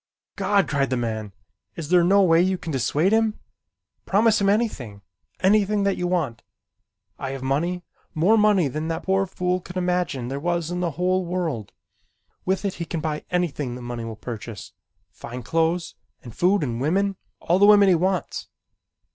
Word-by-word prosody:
"God!" 200 -2 +2
cried 140 -3 0
the 130 - 0
man. 110 -3 -3 0.4
"Is 160 -3 -6
there 180 -1 +5
no 195 +3 +5
way 165 -2 +5
that 185 - +2
you 190 - 0
can 165 - -6
dissuade 145 +7 +1
him? 220 -1 +2 0.7
Promise 215 +2 +3
him 195 - +3
anything. 135 - -1 0.4
Anything 205 +1 +3
that 195 -1 +1
you 180 - -2
want. 150 -10 -1 0.8
I 135 - -4
have 135 -1 -6
money, 170 +7 -1 0.3
more 180 +8 +4
money 210 -6 +4
than 155 +4 -4
that 165 0 -3
poor 195 0 +1
fool 180 0 -1
could 180 +1 -9
imagine 180 -8 -1
there 135 +2 -4
was 170 +1 -1
in 175 - -2
the 170 -4 -2
whole 185 +1 +1
world. 170 - -3 0.7
With 190 +2 0
it 195 - -1
he - - -1
can 165 - -4
buy 155 -1 -3
anything 150 -8 -1
that 125 - -8
money 120 -1 -5
will 115 -1 -6
purchase, 110 -2 -8 0.4
fine 125 +1 -8
clothes 165 +4 0 0.3
and 120 -4 -11
food 185 +1 +2
and 120 -3 -3
women, 195 +7 +1 0.2
all 175 +3 +1
the 205 - +6
women 205 -1 +7
he 190 - +6
wants. 180 +2 -1
175 Hz, 180 wpm, -24 LUFS, 135-190 Hz, 0.8 s, women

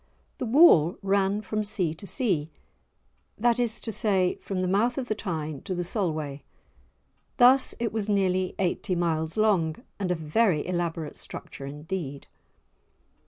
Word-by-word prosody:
The 250 - -2
wall 220 - +6
ran 200 +1 +1
from 215 +1 -2
sea 190 -6 0
to 195 +5 -11
sea, 185 - 0 0.9
that 235 +2 +2
is 235 -2 0
to 225 - -4
say, 195 -5 +2
from 185 -2 -3
the - - 0
mouth 215 +6 +1
of 255 -2 -3
the - - +2
Tyne 155 -8 -4
to 185 - -4
the 175 - -2
Solway. 155 -7 -3 1.0
Thus 255 +2 +6
it 230 -1 -2
was 215 -1 -2
nearly 185 -2 +1
eighty 185 0 -1
miles 160 -1 -1
long, 190 -8 +2 0.2
and 190 -2 -2
a 180 - +1
very 160 +1 +1
elaborate 170 -3 -3
structure 135 - -8
indeed. 150 0 -6
185 Hz, 150 wpm, -26 LUFS, 160-215 Hz, 1.0 s, wall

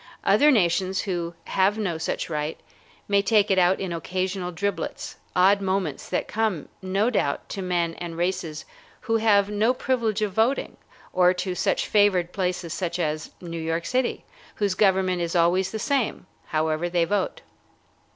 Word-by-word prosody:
Other 295 - +5
nations 190 - +2
who 175 -3 -3
have 195 +3 +2
no 180 -7 -2
such 160 - -2
right 150 -1 -3 0.5
may 200 0 +3
take 210 0 +3
it 190 - +4
out 180 +1 +3
in 185 -3 -3
occasional 185 +2 -3
driblets, 200 +4 -4 0.2
odd 195 +2 +5
moments 190 -6 -2
that - - -1
come, 210 -8 -1
no 195 +5 +1
doubt, 140 - -1
to 195 - -4
men 175 -2 0
and 170 -1 -6
races 170 -3 -2 0.4
who 225 0 +1
have 205 -2 +3
no 220 +5 +2
privilege 230 -5 0
of 205 -3 -2
voting, 225 +7 +1 0.4
or 180 0 +4
to 180 0 -2
such - - 0
favored 190 -4 +3
places 180 -2 -2 0.2
as 155 -3 -2
New 170 -2 -5
York 165 +1 -2
city, 255 0 -1 0.3
whose 200 -2 0
government 190 -2 +2
is 170 +1 -2
always 180 +2 +3
the 220 - -4
same, 260 -2 -1 0.2
however 155 +2 0
they 170 -1 +2
vote. 195 +2 -1
185 Hz, 160 wpm, -25 LUFS, 170-205 Hz, 0.5 s, Other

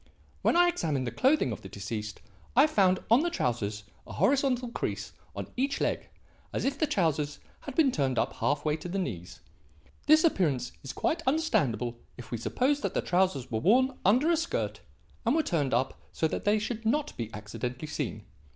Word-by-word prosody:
When - - +3
I 350 0 +6
examined 155 - 0
the 120 - -2
clothing 265 - +3
of 105 - -5
the 95 - -9
deceased, 105 +2 -5 0.3
I 275 +4 +7
found 190 -11 +3
on 240 +5 +7
the 345 - +1
trousers 105 - -2 0.2
a - - -8
horizontal 260 -3 +2
crease - - -4 0.2
on - - -4
each 275 +3 0
leg - - -1 0.4
as - - -2
if 275 +1 -1
the 310 - +2
trousers 160 - 0 0.2
had 280 - -8
been 295 -5 +4
turned 135 - 0
up - - +1
half 145 +1 -1
way 150 0 +1
to 175 - -7
the 190 - -2
knees. 90 - -4 0.7
This 310 +1 +7
appearance 150 - +1
is 135 - -6
quite 325 +1 -1
understandable 125 - +1 0.2
if 120 -2 -10
we 120 - -2
suppose 275 - +1
that - - -2
the - - +1
trousers 180 -9 +1
were 110 - 0
worn 255 - +4
under 255 - +4
a 335 - +3
skirt 335 +1 -2 0.4
and 240 +4 +2
were 320 - +3
turned 145 - 0
up 125 +3 0
so 160 - 0
that - - -4
they 205 +1 +4
should 225 +1 -3
not 285 +7 0
be 115 -2 -5
accidentally 120 +6 -5
seen. - - -4
185 Hz, 195 wpm, -29 LUFS, -, 0.7 s, I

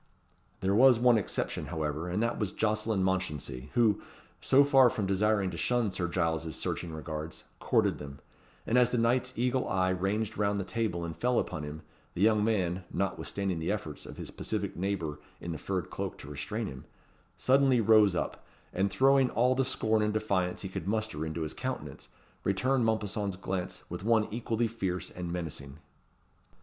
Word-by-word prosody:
There 95 +1 +1
was 125 +3 +7
one 120 -1 +5
exception, 100 - -3
however, 75 +2 -3
and 100 +6 0
that 120 +1 -1
was 105 -4 -1
Jocelyn 110 -2 0
Mounchensey, 75 -8 -2
who, 115 -4 +3 0.4
so 140 +2 +6
far 135 -3 +6
from 105 -3 -2
desiring 100 0 +2
to - - -6
shun 120 -4 +1
Sir 90 -1 -2
Giles's 80 -2 -1
searching 85 - -3
regards, 80 0 -6 0.2
courted - - +2
them; 70 -1 -8 0.5
and 120 +2 +3
as 125 -1 +5
the 125 - 0
knight's 125 +2 +2
eagle 125 +2 +1
eye 95 -1 +2
ranged 100 +4 -1
round 100 -1 +1
the - - -1
table 100 -4 -2
and 80 -1 -5
fell 125 +8 +1
upon 75 - -1
him, 75 +1 -7 0.3
the 90 - -3
young 105 0 +4
man 95 -5 0
(notwithstanding 95 -1 -2
the 80 - -1
efforts 85 -8 -5
of - - -9
his - - -6
pacific - - -3
neighbour 85 -6 -2 0.2
in 85 - -5
the 80 - -5
furred 95 -2 -3
cloak - - -4
to - - -11
restrain 70 - -3
him) 65 -1 -8 0.5
suddenly 135 -1 +4
rose 110 -3 +5
up, - - -3 0.3
and 95 +2 +1
throwing 135 +1 +4
all 125 +2 +3
the 135 +1 +2
scorn 110 -4 +1
and 105 0 +1
defiance 95 -4 0
he 95 - -4
could 95 -1 -5
muster 110 -6 -1
into 80 +1 -3
his 75 - -4
countenance, - - -5 0.3
returned 125 +7 +1
Mompesson's 105 -3 -1
glance 95 0 -4
with - - -6
one 110 -1 +3
equally 115 0 0
fierce 95 -5 -3
and 90 -1 -5
menacing. 75 -5 -5
100 Hz, 180 wpm, -30 LUFS, 85-115 Hz, 0.5 s, was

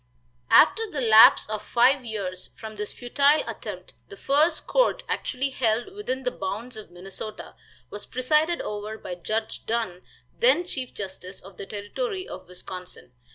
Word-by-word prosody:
After 450 -1 +5
the 300 - -4
lapse 225 -3 +7
of 215 0 -4
five 250 +5 +3
years 195 -5 -5
from 220 -1 -8
this 210 0 -4
futile 280 +5 +2
attempt - - -7 0.2
the 400 - -11
first 310 +3 +2
court - - +2
actually 270 +1 -2
held 240 - 0
within 265 -11 -4
the 250 - 0
bounds 220 +3 -5
of 215 -1 -9
Minnesota 190 +4 -8 0.4
was 205 - -7
presided 305 +7 +1
over 210 +1 -5
by 185 - -7
Judge 215 +6 -3
Dunn, 220 -6 -1 0.3
then 475 -7 +4
chief 260 -7 -5
justice 190 -1 -7
of 190 -1 -14
the 195 - -7
Territory 370 - -4
of - - -9
Wisconsin. 180 -5 -9
225 Hz, 155 wpm, -25 LUFS, 205-280 Hz, 0.4 s, lapse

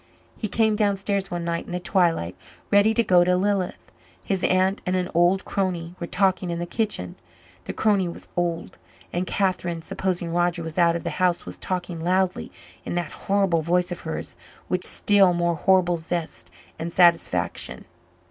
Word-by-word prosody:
He 215 - -3
came 220 0 +2
downstairs 200 -1 0
one 175 -1 -3
night 170 0 -2
in - - -7
the 180 - -1
twilight, 170 - +1 0.4
ready 205 +2 +5
to 235 - +3
go 180 -4 +5
to 180 0 +2
Lilith. 195 -1 -1 0.3
His 190 -2 -2
aunt 185 +1 +2
and 180 - -1
an 180 0 -1
old 175 +3 +3
crony 175 -3 -2
were 170 - -4
talking 185 -1 +1
in 170 - -2
the 175 - -3
kitchen; 175 - -2 0.5
the - - -4
crony 200 -4 +2
was 170 - -9
old, 170 -1 -2 0.3
and 180 +1 -1
Catherine, 175 -4 -1
supposing 175 -1 -2
Roger 175 0 +1
was 160 +2 -4
out 170 -1 +4
of 170 - -4
the - - -2
house, 180 -1 +2
was - - -9
talking 175 -2 -3
loudly 185 +2 0 0.3
in - - -4
that 175 -3 -2
horrible 195 -4 +1
voice 180 +3 +1
of 175 - -4
hers 160 - -5 0.3
with 180 0 0
still 195 -3 +4
more 175 0 +1
horrible 175 +1 +3
zest 165 0 -5 0.3
and 165 +1 -4
satisfaction. 170 -1 +2
180 Hz, 175 wpm, -24 LUFS, 170-190 Hz, 0.5 s, ready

